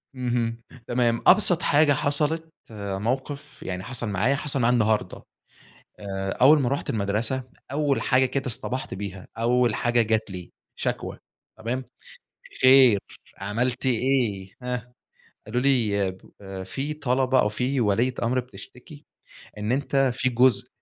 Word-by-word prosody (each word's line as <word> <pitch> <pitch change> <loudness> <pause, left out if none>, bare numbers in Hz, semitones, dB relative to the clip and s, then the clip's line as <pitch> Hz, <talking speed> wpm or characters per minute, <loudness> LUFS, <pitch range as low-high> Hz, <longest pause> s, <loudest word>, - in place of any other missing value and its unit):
إمم، 120 -2 -2 0.3
تمام، 120 -1 +1
أبْسط 185 -3 +6
حاجة 145 0 +4
حصلت 155 +3 -1 0.2
آآ، 100 -2 -4
موقف 135 +4 -4
يعني 90 0 -4
حصل 120 -1 -3
معايا 105 +8 +1
حصل 140 -1 -1
معي 120 +1 +3
النهارده 110 -2 0 0.8
آآ، 95 -1 -4
أول 145 +4 +5
ما 125 - +1
رُحت 140 +2 -2
المَدْرسة 110 +5 -1 0.3
أول 145 -2 +1
حاجة 130 0 +3
كده 135 +2 -3
اصْطَبَحْت 125 0 -3
بيها 95 -1 -7
أول 120 -1 +2
حاجة 120 -1 +2
جات 110 -1 -1
لي 90 -2 -8 0.2
شكْوى، - - -3 0.4
تمام 120 +4 -3 0.8
خير 130 -5 +7 0.4
عملت 120 +6 -2
إيه؟ 120 -6 0
هاه؟ 125 -1 -4 0.6
قالوا 120 +3 -1
لي 110 -8 +2 0.3
آآ، 95 -1 -7
في 135 +10 -4
طلبة 130 -2 +1
أو 105 - +3
في 125 +5 -1
وليّة 115 +4 +1
أمر 125 +2 +1
بتشتكي 125 +3 -12 0.5
إن 105 +3 -1
أنت 135 0 +1
في 130 0 0
جزء 125 0 +3
125 Hz, 135 wpm, -25 LUFS, 110-135 Hz, 0.8 s, خير